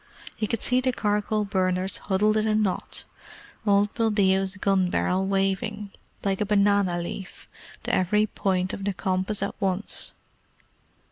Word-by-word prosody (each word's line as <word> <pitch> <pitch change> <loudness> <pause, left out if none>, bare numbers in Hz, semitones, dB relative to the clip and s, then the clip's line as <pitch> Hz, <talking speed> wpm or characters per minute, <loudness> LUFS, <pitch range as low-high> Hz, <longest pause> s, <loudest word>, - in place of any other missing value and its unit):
He 215 - -2
could 225 +1 -2
see 250 0 +3
the 255 0 +1
charcoal 210 -1 0
burners 185 -1 0
huddled 210 +2 +1
in 215 0 +1
a 215 - +2
knot; 210 -4 -1 0.6
old 205 0 +3
Buldeo's 195 -3 +2
gun 190 -2 +2
barrel 185 +2 0
waving, 195 +2 -1 0.3
like 195 0 0
a - - +2
banana 200 -3 +3
leaf, 185 +2 -7 0.4
to - - -2
every 210 +4 +3
point 190 -3 -1
of 195 - -5
the 200 0 -1
compass 190 +2 -1
at 200 - -2
once. 195 +1 0
200 Hz, 145 wpm, -25 LUFS, 190-210 Hz, 0.6 s, see